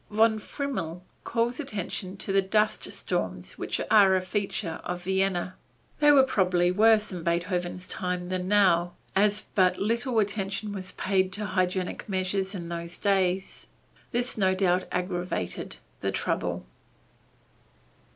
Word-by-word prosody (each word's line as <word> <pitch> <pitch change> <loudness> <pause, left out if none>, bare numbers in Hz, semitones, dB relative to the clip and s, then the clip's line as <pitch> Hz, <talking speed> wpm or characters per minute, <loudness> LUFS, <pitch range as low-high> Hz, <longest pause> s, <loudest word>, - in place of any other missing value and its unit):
Von 220 +1 +3
Frimmel 205 - -4 0.2
calls 235 +3 0
attention 200 - -3
to 195 - -2
the 195 - +5
dust 210 +2 0
storms 95 - -3
which - - -2
are 200 -3 +7
a - - +3
feature 185 -2 -3
of 180 0 -4
Vienna. 190 -1 0 0.5
They 295 -1 +6
were 275 -2 +7
probably 180 -8 +2
worse 215 +2 +4
in 180 -2 -5
Beethoven's 175 +2 -1
time 180 -1 -3
than 185 0 -2
now, 185 -4 +3 0.2
as 205 +1 +3
but 185 -2 +3
little 235 +4 0
attention 205 0 -1
was 185 -2 -5
paid 190 -1 +1
to 210 +2 -1
hygienic 185 0 -1
measures 190 +1 -1
in 170 -3 -5
those 170 0 -6
days. 190 -2 0 0.4
This 240 -1 -1
no 190 -1 +3
doubt 185 -1 +2
aggravated 180 - -3 0.2
the - - -1
trouble. - - -2
190 Hz, 135 wpm, -27 LUFS, 180-210 Hz, 0.5 s, are